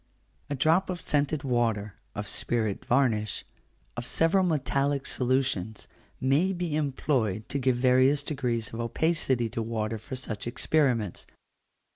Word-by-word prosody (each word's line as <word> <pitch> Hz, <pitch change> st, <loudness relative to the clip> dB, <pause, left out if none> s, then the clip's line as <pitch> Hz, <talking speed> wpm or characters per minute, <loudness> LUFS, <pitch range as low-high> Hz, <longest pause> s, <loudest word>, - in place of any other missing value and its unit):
A 145 Hz, -, -1 dB
drop 160 Hz, +8 st, +3 dB
of 180 Hz, -1 st, -3 dB
scented 145 Hz, -1 st, 0 dB
water, 115 Hz, -6 st, 0 dB, 0.2 s
of 105 Hz, -1 st, -4 dB
spirit 110 Hz, -1 st, -1 dB
varnish, 115 Hz, -5 st, +1 dB, 0.5 s
of 120 Hz, 0 st, -5 dB
several 170 Hz, +4 st, +3 dB
metallic 140 Hz, -4 st, 0 dB
solutions, 125 Hz, -6 st, 0 dB, 0.3 s
may 145 Hz, +9 st, +2 dB
be 175 Hz, -4 st, -2 dB
employed 130 Hz, -8 st, 0 dB
to 140 Hz, -, -1 dB
give 130 Hz, -1 st, +2 dB
various 130 Hz, +3 st, +4 dB
degrees 125 Hz, -7 st, -2 dB
of 115 Hz, -, -5 dB
opacity 130 Hz, 0 st, +1 dB
to 115 Hz, -, -3 dB
water 110 Hz, -1 st, -2 dB
for 120 Hz, +5 st, -7 dB
such 115 Hz, -4 st, -4 dB
experiments. 120 Hz, -, 0 dB
130 Hz, 130 wpm, -28 LUFS, 115-145 Hz, 0.5 s, various